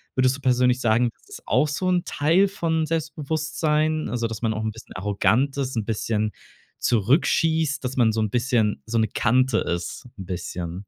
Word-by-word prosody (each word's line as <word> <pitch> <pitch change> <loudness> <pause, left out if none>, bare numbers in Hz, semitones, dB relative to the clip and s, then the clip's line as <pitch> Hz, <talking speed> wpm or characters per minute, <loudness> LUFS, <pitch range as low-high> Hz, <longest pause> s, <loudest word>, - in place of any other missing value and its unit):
Würdest 130 0 +3
du - - -15
persönlich 125 0 +2
sagen, 115 +1 +2
das - - -28
ist - - -10
auch 130 +6 +3
so 185 +5 -1
'n 175 0 +1
Teil 165 +7 +3
von 165 -5 -1
Selbstbewusstsein, 155 -1 -1
also 115 0 -2
dass 110 -1 -6
man 115 -2 +1
auch 110 - -3
'n 110 - -1
bisschen 110 - -13
arrogant 110 +8 +1
ist, 130 -2 -2
'n 110 - -1
bisschen 110 -1 -1 0.5
zurückschießt, 150 - +2
dass 130 +1 -4
man 115 -3 +4
so 110 - -2
'n 105 -2 -1
bisschen 120 -4 +1
so 115 - -1
'ne 110 - +2
Kante 125 +1 +2
ist 85 +8 -4
'n 95 - -7
bisschen. 85 -1 -5
125 Hz, 190 wpm, -24 LUFS, 110-150 Hz, 0.5 s, man